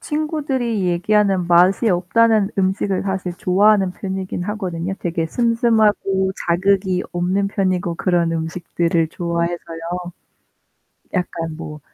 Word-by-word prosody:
친구들이 275 Hz, -, -2 dB
얘기하는 190 Hz, +1 st, +2 dB
맛이 180 Hz, +6 st, +4 dB
없다는 205 Hz, +3 st, +3 dB
음식을 190 Hz, 0 st, 0 dB
사실 190 Hz, -2 st, -3 dB
좋아하는 195 Hz, +1 st, +3 dB
편이긴 190 Hz, -2 st, -4 dB
하거든요. 190 Hz, -3 st, -3 dB
되게 165 Hz, -1 st, -1 dB
슴슴하고 220 Hz, -4 st, +2 dB
자극이 185 Hz, +1 st, +1 dB
없는 185 Hz, +3 st, 0 dB
편이고 185 Hz, -3 st, -1 dB
그런 175 Hz, -2 st, +1 dB
음식들을 165 Hz, 0 st, -1 dB
좋아해서요. 170 Hz, 0 st, -3 dB, 1.2 s
약간 165 Hz, -3 st, -3 dB
뭐 155 Hz, -2 st, -8 dB
185 Hz, 285 characters per minute, -20 LUFS, 170-205 Hz, 1.2 s, 맛이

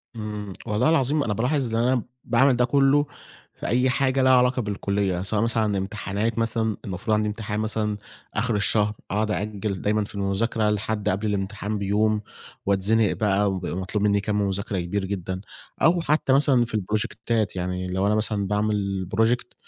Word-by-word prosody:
إمم، 105 Hz, -2 st, -5 dB
والله 105 Hz, +7 st, +2 dB
العظيم 145 Hz, -1 st, +2 dB
أنا 105 Hz, -, -1 dB
بالاحظ 125 Hz, +1 st, 0 dB
إن 115 Hz, -, +2 dB
أنا 125 Hz, -2 st, +2 dB, 0.2 s
باعمل 125 Hz, +3 st, +4 dB
ده 125 Hz, 0 st, +3 dB
كله 140 Hz, +2 st, +3 dB, 0.5 s
في -, -, -6 dB
أي 125 Hz, +3 st, +2 dB
حاجة 135 Hz, +1 st, +1 dB
لها 130 Hz, 0 st, +5 dB
علاقة 125 Hz, 0 st, +4 dB
بالكلية، 100 Hz, -3 st, -1 dB
سواء 105 Hz, +2 st, +1 dB
مثلًا 110 Hz, -3 st, +1 dB
امتحانات 105 Hz, +3 st, -2 dB
مثلًا 115 Hz, -1 st, 0 dB
المفروض 100 Hz, +3 st, -2 dB
عندي 105 Hz, 0 st, +1 dB
امتحان 105 Hz, 0 st, -3 dB
مثلًا 110 Hz, -1 st, -1 dB, 0.4 s
آخر 115 Hz, +1 st, 0 dB
الشهر 105 Hz, +1 st, +2 dB, 0.2 s
أقعد 105 Hz, +2 st, 0 dB
أأجل 105 Hz, -2 st, -3 dB
دايمًا 105 Hz, +1 st, +1 dB
في 100 Hz, -, -8 dB
المذاكرة 105 Hz, +3 st, 0 dB
لحد 105 Hz, 0 st, -1 dB
قبل 100 Hz, +4 st, -1 dB
الامتحان 105 Hz, +1 st, -2 dB
بيوم، 105 Hz, +2 st, +1 dB, 0.4 s
واتزنق 100 Hz, +2 st, +3 dB
بقى 100 Hz, -1 st, +1 dB
وبيبقى 90 Hz, -1 st, -3 dB
مطلوب 95 Hz, +2 st, -2 dB
مني 100 Hz, -1 st, +3 dB
كمّ 105 Hz, 0 st, 0 dB
مذاكرة 100 Hz, -1 st, -2 dB
كبير 95 Hz, +3 st, -2 dB
جدًا، 95 Hz, -1 st, -4 dB, 0.4 s
أو 170 Hz, +1 st, +4 dB
حتى 150 Hz, -4 st, +2 dB
مثلًا 135 Hz, -3 st, +4 dB
في 115 Hz, -, -10 dB
البروجكتات، 110 Hz, +1 st, -1 dB
يعني 90 Hz, 0 st, -3 dB
لو 95 Hz, +2 st, 0 dB
أنا 105 Hz, -, +2 dB
مثلًا 105 Hz, -2 st, -1 dB
باعمل 100 Hz, -3 st, -1 dB
project 120 Hz, +3 st, +1 dB
105 Hz, 170 wpm, -24 LUFS, 100-115 Hz, 0.5 s, لها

